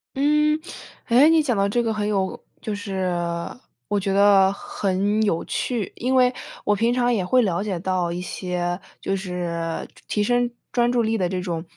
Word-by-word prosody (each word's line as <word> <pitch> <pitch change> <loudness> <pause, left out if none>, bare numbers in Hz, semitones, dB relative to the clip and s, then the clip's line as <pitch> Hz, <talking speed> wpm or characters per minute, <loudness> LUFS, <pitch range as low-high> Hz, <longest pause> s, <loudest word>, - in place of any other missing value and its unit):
嗯， 300 +2 +3 0.5
诶， 255 +6 +6
你 325 -1 +5
讲 255 -7 0
到 200 0 +1
这 240 +4 +1
个 225 -1 0
很 210 -1 -2
有 195 -2 -1 0.2
就 215 - -3
是 195 -3 -2 0.8
我 205 - 0
觉 195 0 -1
得 195 -1 +5
很 200 +2 -1
有 170 -6 +1
趣。 230 -7 -2
因 255 +2 0
为 250 0 +4 0.3
我 210 - +3
平 230 +4 +2
常 245 -1 +2
也 195 -6 0
会 255 +7 +4
了 185 -1 0
解 195 -5 -3
到 180 -1 -1
一 175 - -3
些 180 -1 -3 0.2
就 195 - -1
是 175 -3 -3 0.2
提 210 - 0
升 245 +2 +1 0.2
专 240 0 +3
注 245 -1 +2
力 225 0 0
的 180 -3 0
这 185 0 -2
种， 170 -3 -3
205 Hz, 200 characters per minute, -23 LUFS, 185-240 Hz, 0.8 s, 诶